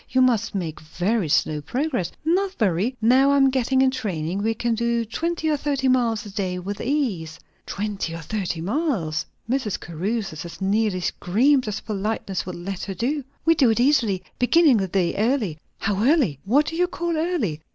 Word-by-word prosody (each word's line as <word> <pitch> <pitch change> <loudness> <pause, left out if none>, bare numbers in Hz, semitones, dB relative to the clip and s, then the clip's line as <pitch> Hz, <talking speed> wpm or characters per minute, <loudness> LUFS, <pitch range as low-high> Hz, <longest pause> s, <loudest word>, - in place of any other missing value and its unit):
You 260 0 +3
must 225 -4 +1
make 165 -5 -3
very 175 +4 -1
slow 150 0 +1
progress?" 245 - -2
"Not 375 +4 +1
very. 210 +4 0
Now 260 +4 +5
I 280 - +4
am 270 -1 +5
getting 260 0 +2
in 260 - +3
training, 190 -7 -3
we 225 +2 0
can 235 +1 0
do 235 0 0
twenty 325 +8 -2
or 305 -1 +2
thirty 275 -2 -1
miles 240 -4 +2
a 205 - -8
day 190 -3 -2
with 195 +3 -5
ease." 205 - -1 0.3
"Twenty 200 -4 -3
or 165 - -6
thirty 180 -2 -3
miles!" 195 - -1 0.2
Mrs. 245 -4 -1
Caruthers 175 0 -3
as 170 - -9
nearly 200 -1 +1
screamed 250 +10 +2
as 210 - -3
politeness 200 -3 -3
would 180 - -5
let 180 +2 -5
her 195 - -5
do. 275 +7 -1 0.2
"We 330 - +6
do 275 -7 +4
it 225 - +1
easily, 240 -8 +2 0.2
beginning 290 0 +5
the 195 -2 0
day 180 -2 0
early." 215 - 0 0.2
"How 200 +1 -1
early? 250 - +3
What 275 +9 +3
do 325 - -4
you 360 +1 +2
call 345 -1 -2
early?" 310 - -1
225 Hz, 185 wpm, -23 LUFS, 185-265 Hz, 0.3 s, We